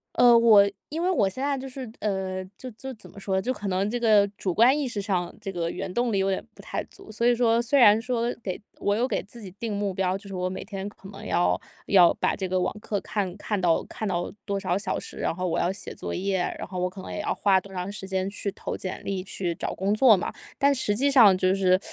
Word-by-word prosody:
呃， 240 -1 +7
我 215 -4 +7 0.2
因 320 +3 -3
为 370 - +2
我 205 - +3
现 255 +8 -5
在 280 -1 0
就 270 +1 -6
是， 255 -2 -7
呃， 190 -2 -2
就 255 -1 -8
就 265 +5 -8
怎 215 - -14
么 - - -12
说 195 -1 -2
呢， 190 - +2
就 255 +5 -1
可 205 -4 -6
能 190 +2 0
这 240 +1 -2
个 210 -3 +5
主 185 -3 -2
观 250 - +5
意 285 -3 -1
识 210 -4 -3
上 185 -4 -1
这 200 -2 -4
个 170 -2 -2
原 180 - -5
动 240 -1 +1
力 200 - +2
有 195 0 +1
点 190 - -1
不 - - -13
太 - - -4
足， 390 - -13
所 235 +3 0
以 245 - +5
说 235 -1 +3
虽 260 +4 +2
然 215 -2 +7
说 240 0 -1
给 185 -5 -4 0.2
我 205 - +1
有 240 +4 +1
给 - - -1
自 235 +3 -11
己 195 -3 -9
定 225 -3 -3
目 200 -1 -1
标， 185 0 0
就 200 0 -12
是 195 - -8
我 185 0 -1
每 185 - -5
天 195 -2 -6
可 195 -1 -14
能 200 +1 -10
要 90 +1 +2 0.3
要 180 -4 +7
把 - - 0
这 190 - -3
个 185 0 0
网 - - -1
课 210 -1 -2
看 195 -4 -3
看 205 -1 -2
到 170 -3 +2
看 215 - -5
到 175 -2 -2
多 200 -2 -1
少 185 -1 0
小 195 -2 -2
时， - - -9
然 - - -1
后 180 +1 -3
我 170 - 0
要 180 - +1
写 195 - -7
作 - - -5
业 190 +1 0
啊， 175 - -1
然 - - -5
后 185 0 -5
我 180 0 0
可 190 +1 -10
能 - - -8
也 - - -4
要 - - -1
花 195 -2 +3
多 195 +1 -14
长 180 +1 -4
时 205 -2 -7
间 190 0 -1
去 200 0 -4
投 - - -5
简 185 - -6
历、 195 -2 -2
去 185 -2 -3
找 - - -4
工 195 +3 0
作 220 -1 +6
嘛， 180 - -3 0.2
但 280 +1 +4
实 225 -6 0
际 275 +5 +2
上 215 -8 +7
就 185 0 +2
是 185 -1 +3
200 Hz, 300 characters per minute, -26 LUFS, 185-230 Hz, 0.3 s, 呃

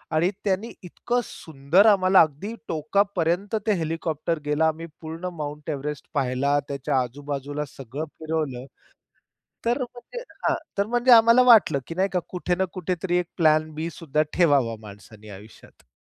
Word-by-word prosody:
आणि 165 +3 +3 0.2
त्यांनी 200 +4 -1
इतकं 240 +7 -2
सुंदर 160 +6 +1
आम्हाला 190 -2 +6
अगदी 160 +8 -1 0.2
टोकापर्यंत 180 +4 0
ते 210 - +4
हेलिकॉप्टर 165 0 -2
गेला. 150 +2 +2
आम्ही 160 +1 -3 0.2
पूर्ण 165 +3 -6
माउंट 150 -1 -6
एव्हरेस्ट 145 +1 -5
पाहिला. 140 +1 +1
त्याच्या 135 -1 -1
आजूबाजूला 145 +3 -5
सगळं 135 +4 -7
फिरवलं. 155 -6 -3 1.0
तर 240 +4 +1
म्हणजे 250 - -7 0.2
हां, - - +2 0.2
तर 200 - +2
म्हणजे 240 +2 +2
आम्हाला 230 +1 +7
वाटलं 215 - +6
की 165 - -6
नाही 190 +1 +1
का 180 - +2
कुठे 180 -1 -1
ना 190 - 0
कुठेतरी 180 0 -1
एक 175 - -3
प्लॅन 155 -1 +3
बीसुद्धा 155 -2 -2
ठेवावा 140 -9 +3
माणसाने 105 +1 -13
आयुष्यात. 105 +2 -15
160 Hz, 140 wpm, -24 LUFS, 145-190 Hz, 1.0 s, आम्हाला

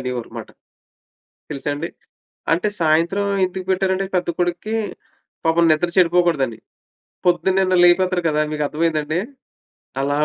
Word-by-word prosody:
అనేవారుమాట. 125 -2 -5 1.0
తెలుసా 145 0 -4
అండి! 145 - -4 0.6
అంటే 175 +5 0
సాయంత్రం 165 +6 +2 0.2
ఎందుకు 185 0 -6
పెట్టారంటే 190 0 0
పెద్ద 175 -1 0
కొడుక్కీ, 175 +5 -1 0.7
పాపం 165 +1 +3
నిద్ర 155 +3 +1
చెడిపోకూడదని. 165 - +2 0.7
పొద్దున్నే 185 +2 +2
నన్ను 185 -1 +2
లేపేత్తరు 180 0 +3
కదా! 150 0 +1
మీకు 150 - -1
అర్థమైందండి? 155 +1 -1 0.8
అలా 145 +1 0
170 Hz, 110 wpm, -20 LUFS, 155-185 Hz, 1.0 s, పాపం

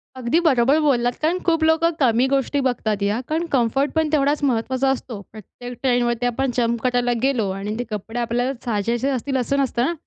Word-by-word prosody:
अगदी 255 +5 +1
बरोबर 270 0 +4
बोललात. 245 -5 +1
कारण 330 +4 +1
खूप 330 -2 +2
लोकं 320 +1 +3
कमी 245 -2 +3
गोष्टी 275 +1 0
बघतात 215 -5 -2
या, 205 +3 0
कारण 320 +2 0
कम्फर्ट 270 +3 +1
पण 320 -1 +1
तेवढाच 290 0 +2
महत्त्वाचा 260 +1 +1
असतो 250 -4 -3
प्रत्येक 245 +4 -10
ट्रेनवरती 245 -2 +1
आपण 250 +2 0
जंप 235 -1 0
करायला 245 -1 +1
गेलो 245 -8 +1
आणि 200 +2 -4
ते - - 0
कपडे 220 +3 -4
आपल्याला 245 +2 -1
साजेसे 235 +4 -1
असतील 265 +1 -1
असं 260 +3 0
नसतं 245 -1 0
ना. 340 - 0
250 Hz, 185 wpm, -21 LUFS, 235-275 Hz, -, बरोबर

